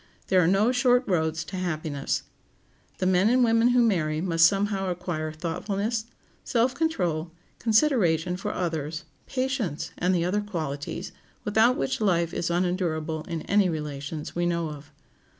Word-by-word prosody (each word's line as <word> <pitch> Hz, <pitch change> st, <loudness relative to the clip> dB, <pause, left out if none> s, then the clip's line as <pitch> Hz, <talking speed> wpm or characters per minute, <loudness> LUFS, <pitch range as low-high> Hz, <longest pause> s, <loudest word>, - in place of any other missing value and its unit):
There 185 Hz, -1 st, +5 dB
are -, -, +3 dB
no 200 Hz, +6 st, +3 dB
short 250 Hz, 0 st, +3 dB
roads 160 Hz, -3 st, 0 dB
to 185 Hz, +3 st, -7 dB
happiness. 155 Hz, -6 st, -2 dB, 0.7 s
The -, -, -1 dB
men 185 Hz, +3 st, +4 dB
and 250 Hz, +1 st, +4 dB
women 230 Hz, 0 st, +4 dB
who 245 Hz, 0 st, +4 dB
marry 155 Hz, -8 st, +1 dB
must 165 Hz, -1 st, +5 dB
somehow 195 Hz, 0 st, 0 dB
acquire 175 Hz, -3 st, -3 dB
thoughtfulness, 200 Hz, +7 st, -2 dB, 0.4 s
self 245 Hz, +2 st, +1 dB
control, 175 Hz, -, -1 dB, 0.3 s
consideration 215 Hz, -, +2 dB
for 200 Hz, +3 st, -3 dB
others, 160 Hz, -4 st, -3 dB, 0.2 s
patience, 255 Hz, -, -2 dB
and 180 Hz, +1 st, +2 dB
the 170 Hz, -1 st, +1 dB
other 200 Hz, +4 st, +1 dB
qualities, 155 Hz, -9 st, -4 dB, 0.3 s
without 220 Hz, +3 st, +3 dB
which 135 Hz, -, -1 dB
life 170 Hz, -5 st, +1 dB
is 170 Hz, -, -1 dB
unendurable 170 Hz, -3 st, -1 dB
in 165 Hz, -2 st, -4 dB
any 200 Hz, -1 st, +3 dB
relations 150 Hz, -1 st, -5 dB
we 175 Hz, 0 st, +1 dB
know 170 Hz, -2 st, -1 dB
of. 145 Hz, -1 st, -11 dB
180 Hz, 150 wpm, -26 LUFS, 160-210 Hz, 0.7 s, There